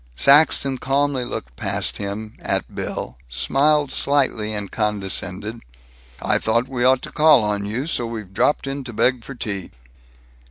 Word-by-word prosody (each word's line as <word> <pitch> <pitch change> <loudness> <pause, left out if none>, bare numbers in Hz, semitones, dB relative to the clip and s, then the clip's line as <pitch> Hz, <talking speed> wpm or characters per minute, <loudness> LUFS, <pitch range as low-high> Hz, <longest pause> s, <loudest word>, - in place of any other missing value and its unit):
Saxton 140 - +4
calmly 140 -1 +1
looked - - -6
past - - -2
him, 105 +2 -5
at - - -2
Bill, 60 - -5
smiled 140 - +2
slightly, 130 -7 +1
and 105 -2 -5
condescended, 105 0 -3 0.6
"I - - +1
thought 115 +3 +1
we 130 -2 -2
ought 130 0 +4
to 150 - -6
call 150 -6 +5
on 105 -1 -1
you, 120 +7 -2
so 120 -7 -1
we've 110 -5 -7
dropped 145 +10 +2
in 135 0 -4
to 120 - -7
beg 125 +2 +2
for 135 - -9
tea." 100 -6 -4
120 Hz, 155 wpm, -21 LUFS, 105-135 Hz, 0.6 s, call